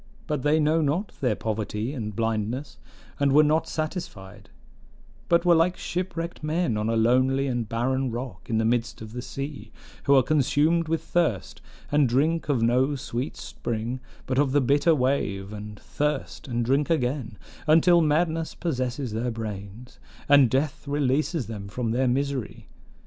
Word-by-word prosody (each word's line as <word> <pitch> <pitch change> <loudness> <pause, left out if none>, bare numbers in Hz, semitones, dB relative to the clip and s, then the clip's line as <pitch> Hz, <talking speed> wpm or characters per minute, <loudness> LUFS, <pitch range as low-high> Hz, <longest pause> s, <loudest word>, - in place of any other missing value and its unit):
But 150 -4 -2
they 150 +3 +3
know 155 +2 +3
not 165 +8 0
their 125 -5 +2
poverty 110 +3 -3
and 105 -7 -5
blindness, 115 +4 -2 0.4
and 140 -1 +3
were 150 +2 +6
not 155 +2 +2
satisfied; 105 - -5 0.8
but 170 +1 +3
were 175 - +6
like 170 +2 +3
shipwrecked 175 -1 -4
men 155 -4 0
on 105 +1 -1
a 115 - +1
lonely 130 +4 +3
and 120 -5 -2
barren 130 +3 0
rock 120 +2 -6
in 115 - +1
the 110 - +1
midst 115 -1 -1
of 110 0 -10
the 125 - -4
sea, 140 +3 -6 0.3
who 140 - +5
are 130 - +6
consumed 155 +4 +2
with 165 0 -1
thirst, 155 - -1 0.3
and 145 -3 +3
drink 155 +7 +1
of 130 -5 +2
no 130 +5 +2
sweet 130 +1 -4
spring, 120 +2 -4 0.3
but 130 0 0
of 140 -2 +2
the 145 - +5
bitter 145 +5 +3
wave, 105 -7 -1
and 105 0 -8
thirst, 150 -2 -3
and 120 -2 -1
drink 140 +5 +1
again, 125 -7 -1 0.3
until 170 +2 +6
madness 160 +1 +1
possesses 130 -6 -2
their 115 +3 -1
brains, 110 +1 -7 0.3
and 140 -3 +6
death 135 +3 -1
releases 145 +1 0
them 105 -3 -7
from 115 +2 -3
their 130 +3 +1
misery. 135 -2 -2
130 Hz, 160 wpm, -26 LUFS, 115-150 Hz, 0.8 s, were